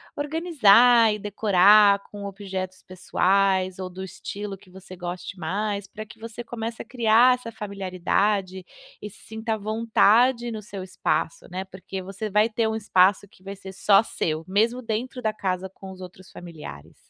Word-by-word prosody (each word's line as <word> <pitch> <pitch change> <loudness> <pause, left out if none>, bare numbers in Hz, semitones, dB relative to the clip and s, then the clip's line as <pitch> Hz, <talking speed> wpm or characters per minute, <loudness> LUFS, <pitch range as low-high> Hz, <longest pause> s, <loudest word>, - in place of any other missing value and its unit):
organizar 250 - +4
e 210 - -5
decorar 205 0 +5
com 205 -1 -9
objetos 190 -2 -6
pessoais 185 0 +1
ou 185 -1 -5
do 185 +1 -9
estilo 200 +1 -7
que 190 - -21
você 185 0 -12
goste 180 +2 -7
mais 200 +4 -3
pra 215 +3 -9
que 220 - -15
você 230 +1 -8
comece 230 -1 -5
a - - -9
criar 240 +1 +4
essa 245 -2 -9
familiaridade 195 -1 -2 0.4
e 210 - -6
se - - -18
sinta 220 0 -3
à - - -6
vontade 230 +3 +2
no 215 -1 -6
seu 200 -1 -8
espaço, 180 -2 -2
né, 185 +2 -4
porque 190 0 -8
você 195 +3 -6
vai 210 +3 +3
ter 225 0 0
um 220 - -2
espaço 200 -2 +3
que 185 - -24
vai 195 +1 -7
ser 190 0 -11
só 195 +1 +4
seu, 160 -6 -3
mesmo 225 +6 +1
dentro 240 +3 -4
da 215 -1 0
casa, 190 -2 -3
com 190 0 -11
os 185 - -12
outros 185 0 -12
familiares. 150 - -11
200 Hz, 170 wpm, -24 LUFS, 185-220 Hz, 0.4 s, decorar